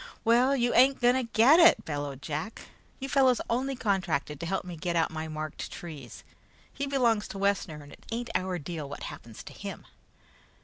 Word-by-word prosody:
"Well, 245 +4 +4
you 245 -2 +1
ain't 265 +2 +5
going 245 0 +4
to 255 -3 -2
get 265 +9 +6
it," 335 -1 +6
bellowed 145 -3 -4
Jack. 155 +8 -5 0.4
"You 270 - -4
fellows 265 -3 +3
only 265 +3 0
contracted 180 - -1
to 170 - -4
help 190 +1 -2
me 180 -1 -7
get 170 +1 -3
out 165 -1 +2
my 160 0 -4
marked 155 -1 -6
trees. 145 -9 -9 0.5
He 280 +1 -3
belong 240 -6 +2
to 195 - -8
Wessner, 195 -6 -1
and 145 - -14
it - - -16
ain't 235 +1 -3
in - - +2
our 185 -1 -3
deal 155 -2 -6
what 145 - -7
happens 115 -2 -9
to - - -11
him." - - -8
195 Hz, 195 wpm, -28 LUFS, 155-245 Hz, 0.5 s, get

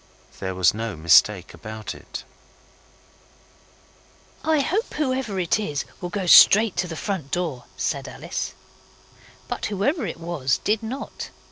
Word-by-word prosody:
There 95 -1 -3
was 90 0 +4
no 115 -1 -4
mistake 85 +4 +4
about 110 0 -7
it. - - -9 2.2
'I 315 -2 +3
hope 395 - -1
whoever 260 -8 -1
it 180 +4 +1
is 150 -9 -2 0.2
will 175 - -3
go 190 +1 -3
straight 210 +4 +8
to 180 - 0
the 165 - -6
front 185 -7 -3
door,' 160 -8 -2
said - - -2
Alice. - - -5 0.9
But - - -3
whoever 215 - 0
it 165 - -6
was 165 -6 0
did 215 +1 +1
not. 245 +5 -6
180 Hz, 135 wpm, -24 LUFS, -, 2.2 s, straight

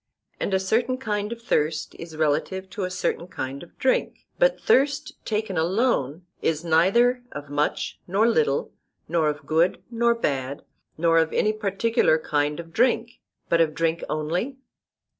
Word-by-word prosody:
And - - -2
a 190 - +3
certain 235 +7 +1
kind 210 -4 -2
of 235 0 -7
thirst 155 -7 0
is 165 -2 -8
relative 160 +5 0
to 195 -1 -3
a - - -3
certain 185 -1 -2
kind 135 -5 -5
of 175 - -14
drink; 260 - 0
but - - +3
thirst 290 +3 +2
taken 210 -5 -1
alone 175 - 0 0.2
is 160 +1 0
neither 200 +10 +4
of 145 -1 -8
much 145 +1 -1
nor 200 +5 +3
little, 155 -11 +1 0.4
nor 160 -1 +2
of 150 -1 -5
good 165 +4 +1
nor 235 0 +2
bad, 140 - -2 0.3
nor 165 0 +4
of 160 -1 +1
any 215 - +2
particular 210 -4 +2
kind 150 -1 -1
of 165 -1 -9
drink, 240 -1 +1 0.3
but 170 - +3
of 155 -2 +1
drink 165 +1 0
only? 175 - -2
175 Hz, 160 wpm, -25 LUFS, 155-230 Hz, 0.4 s, neither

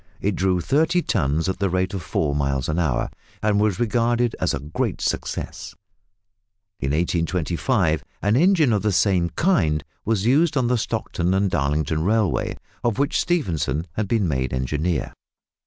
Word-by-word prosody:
It 100 -1 0
drew 90 -1 +1
thirty 160 - +2
tons 80 -3 0
at 95 - -2
the 100 -1 +1
rate 95 +1 0
of 95 - -3
four 75 -2 -1
miles 70 -2 0
an 75 +3 -1
hour, 70 -8 0 0.3
and 105 -1 +2
was 105 -3 +1
regarded 120 +1 +1
as - - +1
a - - -2
great 75 +3 -3
success. - - -3 1.0
In 65 - -2
1825 85 - 0 0.2
an 105 +3 +3
engine 160 - +4
of 105 - +1
the 105 - +1
same 90 -2 +2
kind 80 - +1 0.2
was 105 -2 0
used 145 +5 +3
on 130 - +2
the 125 +1 +2
Stockton 90 -3 -1
and 95 -1 +1
Darlington 75 0 0
Railway, 105 +1 +1 0.3
of 120 -3 0
which 140 +1 +1
Stephenson 85 - -1
had 105 -2 -2
been 105 -3 +1
made 65 -4 -1
engineer. 75 +6 -1
95 Hz, 160 wpm, -23 LUFS, 80-115 Hz, 1.0 s, engine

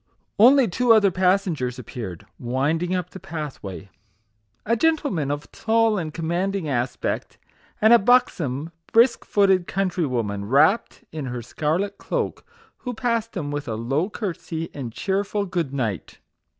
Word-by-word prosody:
Only 255 +3 +7
two 235 +6 +3
other 205 -3 +5
passengers 180 - +1
appeared, 110 -7 -7
wind 135 +7 0
ing 180 +1 -1
up 180 -1 -3
the 190 - -9
pathway 135 - -7 0.7
a 230 - +2
gentleman 280 - +1
of 145 0 -4
tall 225 -2 +2
and 160 -3 -4
commanding 175 +3 -2
aspect, 125 -2 -2 0.4
and 220 +2 +6
a 235 - +8
buxom, 170 - +2 0.2
brisk 235 +2 +4
footed 195 -3 +3
countrywoman, 125 - -1
wrapped 155 - +2
in 155 -3 -5
her 125 -2 -5
scarlet 170 - -2
cloak, - - -3 0.3
who 250 -2 -6
passed 230 -2 -1
him 145 -4 -3
with 145 0 -4
a 110 - -2
low 135 - -1
curtsey 170 -6 -5
and 125 -5 -5
cheer 195 - -1
ful 205 0 -2
good 175 -7 -2
night. 115 - -3
170 Hz, 145 wpm, -23 LUFS, 135-205 Hz, 0.7 s, a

